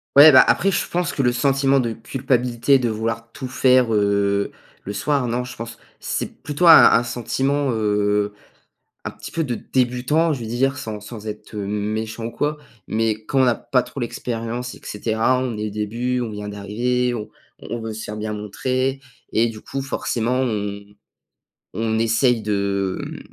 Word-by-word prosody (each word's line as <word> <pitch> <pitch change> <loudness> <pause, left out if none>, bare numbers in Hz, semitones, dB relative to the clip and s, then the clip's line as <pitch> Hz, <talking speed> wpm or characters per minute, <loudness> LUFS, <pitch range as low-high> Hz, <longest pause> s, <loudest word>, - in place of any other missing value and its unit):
Ouais, 145 +3 +10
bah, 130 - +9
après, 195 - +3
je 180 - 0
pense 175 0 0
que - - 0
le 125 -2 +3
sentiment 135 +2 +2
de 120 -3 0
culpabilité, 125 +2 +1
de 120 -2 0
vouloir 115 +1 -3
tout 130 - -6
faire, 125 -2 +3
heu, 100 -1 +1 0.3
le 100 - -5
soir, 140 +1 0
non. 120 +1 -1
Je 125 +1 -8
pense, 115 0 -7 0.2
c'est - - -4
plutôt 150 +4 -1
un 165 - +10
un 115 - +4
sentiment, 135 +4 -1
heu, 105 -2 +1 0.7
un - - -3
petit - - -10
peu 165 - -1
de 130 -5 -2
débutant. 130 +8 +1
Je 135 - -4
veux 115 - -5
dire, 130 +4 0
sans 110 -4 -6
sans 110 0 -9
être, 105 +1 -8
heu, 100 -2 -3
méchant 110 +2 -3
ou 115 - -4
quoi, 150 +4 -1 0.3
mais 110 -1 0
quand 135 - 0
on - - +5
a 120 - +4
pas 125 +2 0
trop 140 - -9
l'expérience 120 +1 -4
et - - -14
cetera, 110 +4 0
on 130 -3 -2
est 105 0 -2
début 115 +5 -2
on 115 -2 -3
vient 105 0 -6
d'arriver, 120 +5 -1
on 110 -3 -5 0.3
on 120 - -5
veut 110 0 -5
se 110 - -6
faire 105 - -6
bien 105 0 -3
montrer 130 +6 -2 0.3
et, 115 +2 +3
du 110 - -8
coup, 135 - -4
forcément, 125 -2 -1
on 105 -5 -2 0.9
on 110 0 -1
essaie 115 +3 +3
de, 100 -2 -1
mmh, - - -6
115 Hz, 185 wpm, -21 LUFS, 105-130 Hz, 0.9 s, Ouais